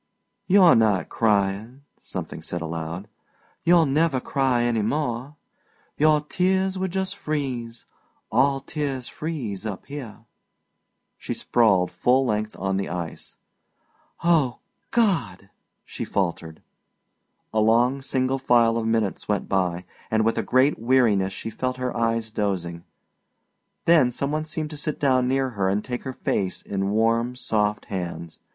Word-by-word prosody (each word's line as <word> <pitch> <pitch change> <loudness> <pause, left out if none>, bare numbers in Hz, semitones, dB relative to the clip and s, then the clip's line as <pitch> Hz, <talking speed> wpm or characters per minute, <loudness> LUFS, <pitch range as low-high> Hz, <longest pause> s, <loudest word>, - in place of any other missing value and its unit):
"You're 185 -3 +7
not 105 -6 +2
crying," 105 +4 0 0.2
something - - -6
said 85 - -4
aloud. 80 +3 -5 0.6
"You'll 170 -1 +5
never 145 0 +2
cry 130 -2 +1
any 120 -2 +1
more. 130 +3 -2 0.6
Your 150 0 +4
tears 190 +4 0
would 190 0 -2
just 190 +1 -2
freeze; 125 -6 -4 0.5
all 135 0 +3
tears 135 -3 -3
freeze 130 - -5
up 105 -4 -5
here!" 125 -6 -8 0.9
She - - -4
sprawled 100 -7 +2
full 130 +2 +2
length 110 -2 -1
on 95 0 -1
the 100 - -2
ice. 85 -2 -6 0.9
"Oh, 155 -8 +3 0.3
God!" 125 - 0 0.3
she - - -6
faltered. 85 -4 -3 0.9
A 110 - +2
long 120 +5 +3
single 130 0 0
file 115 -3 +3
of 115 -1 -1
minutes 110 -3 0
went 105 -1 -1
by, 90 -2 0 0.2
and 110 0 +2
with 115 - +2
a - - +2
great 130 +3 +2
weariness 115 -6 +3
she 110 +3 -6
felt 125 +3 -3
her 125 -1 -3
eyes 115 -1 0
dosing. 90 -5 -2 1.0
Then 160 -7 +5
some 140 +3 -3
one 155 +1 -1
seemed 155 0 -4
to 150 - -7
sit 150 0 -3
down 130 -3 +3
near 135 0 +1
her 100 -4 0
and 100 +2 -1
take 125 +1 -5
her 130 - -4
face 95 -6 -2
in 100 -1 -2
warm, 115 +3 +1
soft 105 -4 -1
hands. 85 -4 -5
120 Hz, 140 wpm, -24 LUFS, 100-140 Hz, 1.0 s, You're